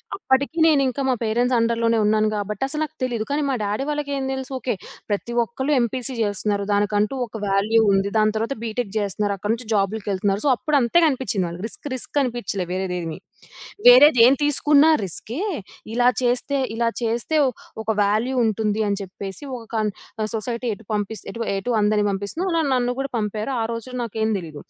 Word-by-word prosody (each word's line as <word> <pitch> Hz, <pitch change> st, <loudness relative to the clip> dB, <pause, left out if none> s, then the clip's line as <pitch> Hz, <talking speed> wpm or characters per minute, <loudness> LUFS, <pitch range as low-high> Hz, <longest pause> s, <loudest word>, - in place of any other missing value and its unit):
అప్పటికి 280 Hz, -1 st, 0 dB
నేను 295 Hz, -3 st, +4 dB
ఇంకా 265 Hz, +2 st, -2 dB
మా -, -, +3 dB
పేరెంట్స్ 240 Hz, +3 st, +1 dB
అండర్‌లోనే 230 Hz, 0 st, +2 dB
ఉన్నాను 215 Hz, 0 st, +3 dB
గాబట్టి 210 Hz, +5 st, -3 dB
అసలు 300 Hz, +3 st, -3 dB
నాకు 310 Hz, 0 st, -6 dB
తెలీదు. 235 Hz, -4 st, -1 dB
కానీ 295 Hz, +1 st, +1 dB
మా 265 Hz, -, +1 dB
డ్యాడీ 210 Hz, +6 st, -1 dB
వాళ్ళకేం 285 Hz, -2 st, -2 dB
తెలుసు, 265 Hz, +1 st, -5 dB
ఓకే. 245 Hz, -5 st, -2 dB, 0.3 s
ప్రతి 210 Hz, +3 st, -2 dB
ఒక్కళ్ళు 265 Hz, +6 st, -2 dB
ఎంపీసీ 250 Hz, +2 st, -2 dB
చేస్తున్నారు. 205 Hz, 0 st, -1 dB
దానికంటూ 205 Hz, +4 st, +1 dB
ఒక 220 Hz, -1 st, -8 dB
వాల్యూ 210 Hz, +3 st, +3 dB
ఉంది. 195 Hz, +1 st, +1 dB
దాని 215 Hz, 0 st, +3 dB
తర్వాత 230 Hz, +5 st, -2 dB
బీటెక్ 225 Hz, -2 st, -3 dB
చేస్తున్నారు. 205 Hz, 0 st, -1 dB
అక్కడి 210 Hz, +4 st, -1 dB
నుంచి 235 Hz, -1 st, -10 dB
జాబ్స్‌కి 205 Hz, +1 st, 0 dB
వెళ్తున్నారు. 195 Hz, +3 st, 0 dB
సో 275 Hz, -, +5 dB
అప్పుడు 300 Hz, +3 st, 0 dB
అంతే 240 Hz, +9 st, +3 dB
కనిపించింది 250 Hz, -9 st, -1 dB
వాళ్ళకి. 175 Hz, +5 st, -6 dB
రిస్క్, 290 Hz, -, -7 dB
రిస్క్ 285 Hz, +3 st, -2 dB
అనిపించలేదు 200 Hz, -7 st, -3 dB
వేరేది 185 Hz, -1 st, -2 dB
ఏమి. 165 Hz, -1 st, -5 dB, 0.7 s
వేరేదేం 250 Hz, -1 st, +8 dB
తీసుకున్నా 295 Hz, +1 st, +4 dB
రిస్కే. 230 Hz, -, -3 dB, 0.5 s
ఇలా 245 Hz, 0 st, +4 dB
చేస్తే, 250 Hz, +3 st, +1 dB, 0.2 s
ఇలా 235 Hz, 0 st, +1 dB
చేస్తే 235 Hz, +7 st, 0 dB, 0.5 s
ఒక 220 Hz, -, -1 dB
వాల్యూ 220 Hz, +6 st, +1 dB
ఉంటుంది 220 Hz, 0 st, 0 dB
అని 200 Hz, 0 st, 0 dB
చెప్పేసి 195 Hz, +5 st, -8 dB, 0.2 s
ఒక 230 Hz, 0 st, -12 dB, 0.6 s
సొసైటీ 235 Hz, +2 st, -4 dB
ఎటు 200 Hz, 0 st, -18 dB
పంపిస్తే 210 Hz, +1 st, -3 dB
ఇటు 230 Hz, -, -4 dB
ఇటు 220 Hz, +6 st, -3 dB
అందరినీ 210 Hz, 0 st, +2 dB
పంపిస్తుందో 200 Hz, -, -3 dB
అలా 330 Hz, -, +2 dB
నన్ను 245 Hz, 0 st, +1 dB
కూడా 275 Hz, 0 st, -1 dB
పంపారు. 215 Hz, +3 st, -3 dB
ఆ -, -, +1 dB
రోజుల్లో 250 Hz, +2 st, -6 dB
నాకేం 220 Hz, -1 st, -1 dB
తెలీదు. 155 Hz, -4 st, -8 dB
230 Hz, 170 wpm, -22 LUFS, 205-260 Hz, 0.7 s, వేరేదేం